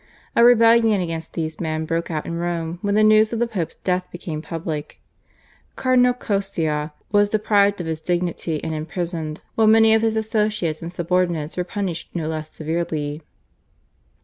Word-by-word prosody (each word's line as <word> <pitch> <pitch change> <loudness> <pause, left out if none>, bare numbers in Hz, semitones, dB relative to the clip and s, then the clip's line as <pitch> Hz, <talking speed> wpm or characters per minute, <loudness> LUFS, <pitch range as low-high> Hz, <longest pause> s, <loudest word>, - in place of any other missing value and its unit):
A 235 - +5
rebellion 230 -3 +6
against 165 -2 -4
these 160 -2 -4
men 160 -1 -2
broke 165 +1 -2
out 155 -2 -3
in - - -4
Rome 170 -1 -3
when 200 0 0
the 215 - +4
news 215 0 +5
of 230 - -2
the 240 - +2
Pope's 195 -9 -4
death 180 0 -1
became 165 -3 -5
public. 155 -1 -5 0.8
Cardinal 250 -1 +3
Coscia 165 -9 -2 0.2
was 205 0 +4
deprived 205 -2 +2
of 175 - -4
his 160 -1 -3
dignity 175 -2 -1
and 160 - -3
imprisoned, 160 0 -4
while 220 -1 +3
many 220 0 +6
of 220 - +4
his 225 -1 +1
associates 210 -7 -1
and 165 +1 -6
subordinates 175 -3 0
were 180 - -1
punished 180 -3 -4
no 160 -3 -2
less 155 -1 -4
severely. 155 -2 -3
175 Hz, 165 wpm, -22 LUFS, 160-215 Hz, 0.8 s, rebellion